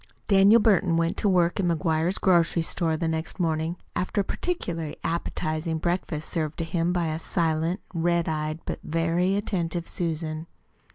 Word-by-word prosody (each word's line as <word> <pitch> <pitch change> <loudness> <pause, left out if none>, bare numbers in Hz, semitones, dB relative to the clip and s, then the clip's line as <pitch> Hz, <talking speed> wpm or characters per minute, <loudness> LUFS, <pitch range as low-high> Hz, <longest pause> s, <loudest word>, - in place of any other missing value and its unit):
Daniel 200 +3 +6
Burton 190 -6 +3
went 165 0 +1
to 205 - +2
work 175 -1 +2
in 185 - +2
McGuire's 165 +2 +1
grocery 170 -2 +3
store 165 -1 0
the 165 - -1
next 160 +3 -3
morning, 165 0 0 0.2
after 185 +3 0
a - - -1
particularly 175 - -3
appetizing 160 -1 -2
breakfast 170 -2 -2
served 155 -3 -2
to 165 - -2
him 165 +1 0
by 175 -1 0
a 155 +1 -2
silent, 165 +2 0
red 170 0 +1
eyed, 155 0 -2
but - - -4
very 165 +4 +1
attentive 175 -4 -2
Susan. 160 -1 -3
170 Hz, 160 wpm, -26 LUFS, 160-180 Hz, 0.2 s, Daniel